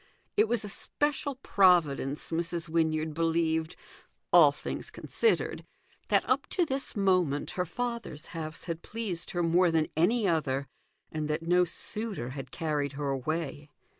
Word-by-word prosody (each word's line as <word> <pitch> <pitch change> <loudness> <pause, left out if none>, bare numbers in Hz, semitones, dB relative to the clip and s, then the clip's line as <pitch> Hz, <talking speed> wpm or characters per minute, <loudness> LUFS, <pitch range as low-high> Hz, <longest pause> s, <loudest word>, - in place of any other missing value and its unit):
It 215 - +4
was 230 -2 0
a - - -5
special 285 +6 -1
providence, 155 -7 +3
Mrs. 170 0 -1
Wynyard 160 -1 0
believed, 160 0 0 0.6
all - - +8
things - - -5
considered, 460 - 0 0.4
that - - +2
up - - +1
to 355 - +1
this 270 -3 -3
moment 185 -8 +2
her 180 -1 -2
father's 235 -6 -4
house 160 -1 -5
had 165 -1 -4
pleased 210 -7 -4
her 175 -1 -1
more 175 +2 +4
than 160 -1 +1
any 205 +7 +3
other, 140 -5 0 0.5
and 155 -1 -2
that 155 +2 -2
no 180 +1 +4
suitor 205 - -1
had 135 -1 -7
carried 145 -2 -2
her 140 0 -3
away. 145 +1 -3
165 Hz, 145 wpm, -29 LUFS, 155-195 Hz, 0.6 s, all